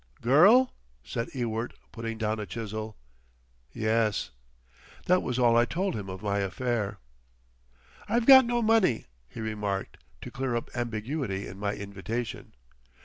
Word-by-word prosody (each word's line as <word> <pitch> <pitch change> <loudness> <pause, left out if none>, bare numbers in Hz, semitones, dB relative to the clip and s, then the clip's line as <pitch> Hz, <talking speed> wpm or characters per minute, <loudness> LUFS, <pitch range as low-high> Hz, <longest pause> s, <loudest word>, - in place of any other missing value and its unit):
"Girl?" 195 - +6 0.3
said 115 +12 -4
Ewart, 115 -2 -3 0.2
putting 115 -1 -5
down 110 0 -1
a 105 - -5
chisel. 110 -1 -5 0.7
"Yes." 110 -1 0 0.7
That 180 +1 +4
was 125 -1 -2
all 120 -2 +4
I 120 +1 +5
told 185 +8 -1
him 100 -3 -5
of 95 +2 -7
my 100 -1 0
affair. 105 +1 -2 1.1
"I've 235 0 +2
got 265 0 +10
no 240 0 0
money," 215 - +3 0.2
he 115 - -8
remarked, 105 -3 -3 0.2
to - - -8
clear 130 -2 -2
up 115 - -4
ambiguity 115 -2 -3
in 95 - -9
my 100 0 -1
invitation. 100 +4 -5
115 Hz, 140 wpm, -28 LUFS, 105-130 Hz, 1.1 s, got